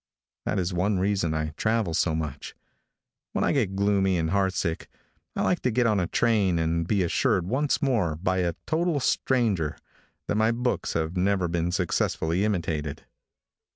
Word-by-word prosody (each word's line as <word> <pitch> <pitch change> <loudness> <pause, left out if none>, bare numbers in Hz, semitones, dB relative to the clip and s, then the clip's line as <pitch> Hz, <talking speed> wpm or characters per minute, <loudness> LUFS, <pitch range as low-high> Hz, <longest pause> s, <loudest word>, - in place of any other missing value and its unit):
That - - -1
is 90 0 -1
one 95 +3 +1
reason 95 -4 0
I 75 0 -1
travel 110 +2 0
so 80 0 +1
much. 75 -3 -5 0.8
When - - 0
1 - - +2
get 105 -9 0
gloomy 100 -2 +2
and 80 -1 -1
heartsick, 95 -4 0 0.5
I - - 0
like 180 - +1
to 125 - 0
get 125 +1 +1
on 105 -3 +3
a 90 - 0
train 105 -7 +2
and 80 0 0
be 100 -2 +2
assured 85 +1 +1
once 135 +10 0
more, 110 - +1
by 95 +3 -1
a 85 -2 0
total 160 -1 0
stranger, 115 - +1 0.5
that - - 0
my 110 +2 +3
books 125 +1 -1
have 80 +2 -2
never 95 0 +1
been 85 0 -1
successfully 85 +1 0
imitated. 80 -7 -2
95 Hz, 165 wpm, -26 LUFS, 85-110 Hz, 0.8 s, on